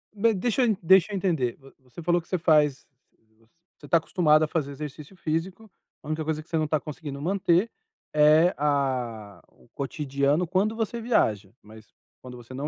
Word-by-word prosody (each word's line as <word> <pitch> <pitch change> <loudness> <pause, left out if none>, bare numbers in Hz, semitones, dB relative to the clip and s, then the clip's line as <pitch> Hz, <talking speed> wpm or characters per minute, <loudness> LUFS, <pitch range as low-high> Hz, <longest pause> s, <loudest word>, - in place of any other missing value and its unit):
Ma 225 +2 +2
deixa 240 +5 0
eu 220 -3 +2
deixa 190 +3 +5
eu - - -1
entender, 160 -11 0
vo 135 -1 -18
você 130 +6 -12
falou 175 +1 +2
que - - -26
você 185 - -1
faz 150 -4 +2 0.5
você 115 - -28 0.3
você - - -13
tá 170 - +4
acostumado 160 -2 +2
a - - +1
fazer 150 -3 -2
exercício 150 +4 -9
físico, 180 +6 -4 0.3
a - - -12
única 155 +1 -2
coisa 155 0 -2
que 165 - -30
você 165 - -1
não 155 -1 0
tá 155 0 0
conseguindo 145 -2 -8
manter 185 +3 +1 0.5
é 155 +4 +5
a 125 - -2
o - - -26
cotidiano, 140 +3 -1
quando 195 +5 0
você 225 +1 -3
viaja, 110 - 0
mas 110 0 -16 0.3
quando 125 -1 -10
você 120 +1 -14
não 140 +3 -4
155 Hz, 190 wpm, -26 LUFS, 140-180 Hz, 0.5 s, deixa